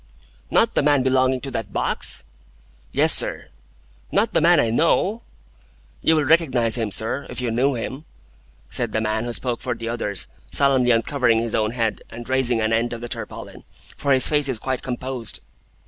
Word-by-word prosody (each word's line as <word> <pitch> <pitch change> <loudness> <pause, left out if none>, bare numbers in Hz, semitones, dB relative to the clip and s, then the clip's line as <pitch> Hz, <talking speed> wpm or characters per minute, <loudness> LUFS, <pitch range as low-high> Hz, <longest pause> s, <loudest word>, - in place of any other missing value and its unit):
"Not - - +3
the - - +2
man 145 -2 +3
belonging 130 0 +2
to 135 - -6
that 115 -5 -4
box?" - - 0 0.7
"Yes, - - +3
sir." - - 0 0.6
"Not - - +1
the - - +3
man - - +5
I 115 - +2
know?" 185 - +1 0.8
"You 160 - +3
will 155 - +2
recognise 130 -7 +2
him, 115 -3 -1
sir, 110 +7 -2
if - - -6
you 125 -2 -2
knew 130 +4 +1
him," 130 +6 -6 0.7
said 120 -3 0
the - - +1
man 110 +1 -1
who 120 - -4
spoke 120 -1 -3
for 125 -1 -2
the 115 0 -5
others, 105 -6 -2 0.2
solemnly 135 -3 +3
uncovering 115 0 +2
his 115 0 -1
own 110 -1 +1
head, 115 -3 -1
and 120 +1 -9
raising 130 -3 +1
an 110 +1 +1
end 115 +1 0
of 115 - -7
the 120 - -6
tarpaulin, - - -7 0.3
"for 140 - -1
his 130 -1 +6
face 150 -2 +1
is 130 - -1
quite 130 +2 -3
composed." 125 -2 -3
125 Hz, 185 wpm, -22 LUFS, 115-135 Hz, 0.8 s, his